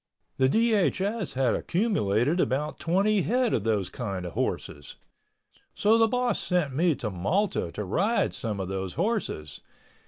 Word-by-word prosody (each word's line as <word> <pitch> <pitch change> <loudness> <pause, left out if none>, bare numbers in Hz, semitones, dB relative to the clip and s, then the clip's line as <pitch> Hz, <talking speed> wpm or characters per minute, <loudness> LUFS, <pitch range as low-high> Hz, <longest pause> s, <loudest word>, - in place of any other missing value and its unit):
The 130 0 +3
DHS 210 - +1
had 130 -3 +1
accumulated 160 - +1
about 150 0 -1
twenty 195 +4 +2
head 245 +4 +1
of 105 - 0
those 105 -4 0
kind 100 -7 -4
of 85 - -6
horses. 75 0 -3 0.8
So 220 +2 +3
the 225 - +5
boss 250 +1 0
sent 175 -7 0
me 165 +1 +3
to 115 -6 -4
Malta 100 - -1
to 105 - -4
ride 195 - +1
some 110 -6 -4
of 95 - -3
those 95 -1 -4
horses. 180 - -2
155 Hz, 150 wpm, -27 LUFS, -, 0.8 s, the